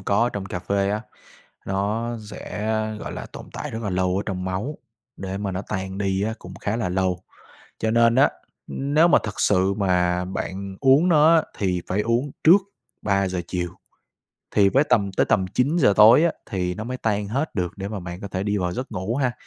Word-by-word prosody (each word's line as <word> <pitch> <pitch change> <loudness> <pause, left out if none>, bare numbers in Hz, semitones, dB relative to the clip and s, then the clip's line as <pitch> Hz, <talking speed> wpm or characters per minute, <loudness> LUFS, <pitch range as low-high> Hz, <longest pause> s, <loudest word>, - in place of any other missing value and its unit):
có 100 +3 +1
ở 120 - +3
trong 100 -2 -4
cà 90 - -4
phê 100 +1 0
á, 105 - -1 0.7
nó 105 +5 -1
dẽ, 105 -1 -10 0.3
a, 110 0 0
gọi - - -6
là, - - -6
tồn - - -10
tại - - -5
rất 115 +1 -5
là 100 - -1
lâu 90 0 0
ở 100 - -1
trong 95 -2 -3
máu, 100 +11 -3 0.4
để 95 0 -4
mà 100 -1 -3
nó 95 - -3
tan 95 0 -4
đi 95 -1 0
á 110 +2 -1
cũng 90 +1 -10
khá 105 +4 -2
là 110 -6 -1
lâu. 95 -1 -1 0.6
Cho 110 - 0
nên 115 0 +4
á, 135 +2 +5 0.4
ưm, 140 +2 -3
nếu 165 +3 +6
mà - - +6
thực 105 -1 -5
sự 95 0 +3
mà 90 -2 +1
bạn 95 +1 -5
uống 140 +6 +5
nó 160 0 +6
á, 160 - +5 0.2
thì 90 -3 0
phải 100 +3 0
uống 120 +6 0
trước 180 +6 +8 0.4
3:00 100 -3 0
chiều 90 -2 -3 0.8
thì 100 -1 +4
với 135 +8 +3
tầm 100 -7 +1
tới - - +1
tầm 95 - +2
9:00 130 - +2
tối 110 +9 +8
á, 170 - +2 0.2
thì 90 -2 -1
nó 110 - -6
mới 130 +1 -4
tan 105 -4 -1
hết 135 +8 -2
được 90 -4 -1
để 100 0 -5
mà 105 -3 -5
bạn 90 0 -7
có 100 - -6
thể 95 0 -3
đi 105 0 0
vào 90 -1 -1
giấc 125 +7 -5
ngủ 95 +6 -2
ha. 130 -3 +1
100 Hz, 220 wpm, -23 LUFS, 95-115 Hz, 0.8 s, trước